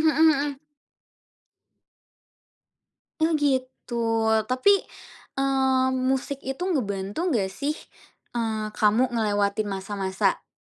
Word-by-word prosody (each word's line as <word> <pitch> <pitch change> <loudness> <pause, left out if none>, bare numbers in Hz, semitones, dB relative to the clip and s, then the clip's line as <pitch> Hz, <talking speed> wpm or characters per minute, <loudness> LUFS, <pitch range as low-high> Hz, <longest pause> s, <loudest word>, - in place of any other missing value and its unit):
mhm 315 0 +5 0.2
mhm. 275 - -9 2.6
Oh, 320 0 +3
gitu. 260 -4 -1 0.5
Tapi, 255 +11 +4 0.6
eee, 265 -1 +2
musik 265 +2 -1
itu 270 +6 -5
ngebantu 225 - -1
nggak 205 - +1
sih, 290 +7 -2 0.6
eee, 220 -2 -2
kamu 225 +5 +2
ngelewatin 205 -2 0
masa-masa, 195 -1 -1
eee, - - -48
255 Hz, 90 wpm, -25 LUFS, 210-275 Hz, 2.6 s, mhm